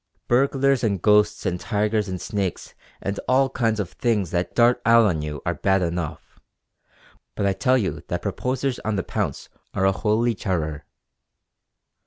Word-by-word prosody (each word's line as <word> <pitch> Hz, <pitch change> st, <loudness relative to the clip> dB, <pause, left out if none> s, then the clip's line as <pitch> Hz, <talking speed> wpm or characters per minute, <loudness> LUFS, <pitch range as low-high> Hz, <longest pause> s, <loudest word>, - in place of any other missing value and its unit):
Burglars 135 Hz, +1 st, +2 dB
and 100 Hz, -4 st, +1 dB
ghosts 105 Hz, +2 st, +3 dB
and 90 Hz, 0 st, -1 dB
tigers 105 Hz, -1 st, 0 dB
and 95 Hz, -1 st, -4 dB
snakes 100 Hz, -4 st, -3 dB, 0.3 s
and 100 Hz, +1 st, -2 dB
all 135 Hz, +1 st, +3 dB
kinds 115 Hz, -4 st, 0 dB
of 95 Hz, -5 st, -3 dB
things 105 Hz, -8 st, 0 dB
that 90 Hz, 0 st, -2 dB
dart 120 Hz, +1 st, +4 dB
out 115 Hz, 0 st, +6 dB
on 85 Hz, -7 st, +1 dB
you 75 Hz, -1 st, -5 dB
are -, -, 0 dB
bad 95 Hz, -1 st, +1 dB
enough; 85 Hz, -2 st, -4 dB, 1.0 s
but 100 Hz, -, -1 dB
I 100 Hz, -, +2 dB
tell 130 Hz, +7 st, +2 dB
you 105 Hz, -6 st, -2 dB
that -, -, -3 dB
proposers 130 Hz, 0 st, -2 dB
on 110 Hz, -1 st, -2 dB
the 95 Hz, -, -1 dB
pounce -, -, -3 dB, 0.3 s
are 95 Hz, -, +1 dB
a 95 Hz, -, +5 dB
holy 110 Hz, +4 st, +1 dB
terror. 80 Hz, -7 st, -3 dB
105 Hz, 165 wpm, -23 LUFS, 95-120 Hz, 1.0 s, out